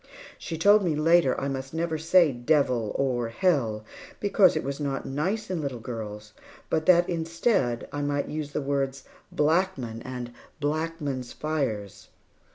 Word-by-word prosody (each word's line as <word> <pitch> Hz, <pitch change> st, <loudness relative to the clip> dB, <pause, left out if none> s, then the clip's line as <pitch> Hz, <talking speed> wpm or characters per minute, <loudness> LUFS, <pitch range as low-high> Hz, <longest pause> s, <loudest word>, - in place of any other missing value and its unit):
She 165 Hz, -, -5 dB
told 205 Hz, +5 st, +5 dB
me, 165 Hz, -4 st, +1 dB
later, 160 Hz, -3 st, +3 dB
I 135 Hz, -, -2 dB
must 135 Hz, +1 st, -5 dB
never 165 Hz, -1 st, -1 dB
say 165 Hz, 0 st, +5 dB
"devil," 125 Hz, -3 st, +1 dB
or 125 Hz, -4 st, 0 dB
"hell," 115 Hz, -, 0 dB, 0.3 s
because 200 Hz, -3 st, +4 dB
it 155 Hz, -, -1 dB
was 140 Hz, +1 st, -4 dB
not 140 Hz, -2 st, -2 dB
nice 190 Hz, +10 st, -2 dB
in 175 Hz, -3 st, -1 dB
little 135 Hz, -4 st, -4 dB
girls, 105 Hz, -2 st, -7 dB, 0.4 s
but 160 Hz, 0 st, 0 dB
that, 175 Hz, -1 st, +6 dB
instead, 165 Hz, -, 0 dB
I 145 Hz, -, -2 dB
might 145 Hz, 0 st, -1 dB
use 150 Hz, -1 st, -4 dB
the 145 Hz, -, -2 dB
words, 135 Hz, -1 st, -1 dB, 0.3 s
"blackman," 150 Hz, -8 st, 0 dB
and 125 Hz, -1 st, -6 dB, 0.3 s
"blackman's 145 Hz, -4 st, -2 dB
fires." 110 Hz, -10 st, -3 dB
145 Hz, 150 wpm, -27 LUFS, 125-165 Hz, 0.4 s, that